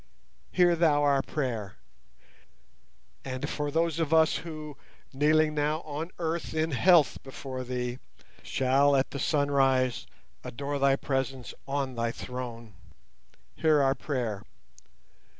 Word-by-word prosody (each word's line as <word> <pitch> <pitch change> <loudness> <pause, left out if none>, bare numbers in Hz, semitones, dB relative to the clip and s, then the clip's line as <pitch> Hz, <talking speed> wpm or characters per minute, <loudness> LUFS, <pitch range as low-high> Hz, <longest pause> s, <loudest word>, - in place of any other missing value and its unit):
Hear 175 -1 +4
Thou 155 -3 +3
our 140 -1 +3
prayer! 115 -10 -3 1.5
And 130 +1 -4
for 145 -1 -3
those 165 +1 0
of 160 -2 -1
us 160 -1 +4
who, 155 -3 -8 0.4
kneeling 155 +2 +3
now 150 +1 0
on 155 +2 -5
earth 165 -1 -3
in 160 +1 0
health 165 +2 +4
before 130 -1 -7
Thee, 125 0 -3 0.4
shall 135 +2 +2
at 135 0 +1
the 140 - -5
sunrise 135 -4 +1 0.4
adore 140 +3 -4
Thy 135 0 +4
Presence 135 -2 -3
on 135 -1 -2
the 115 -1 -1
Throne, 120 -3 -7 0.8
hear 155 -2 +3
our 135 0 +3
prayer! 125 -7 -3
140 Hz, 120 wpm, -28 LUFS, 130-155 Hz, 1.5 s, Hear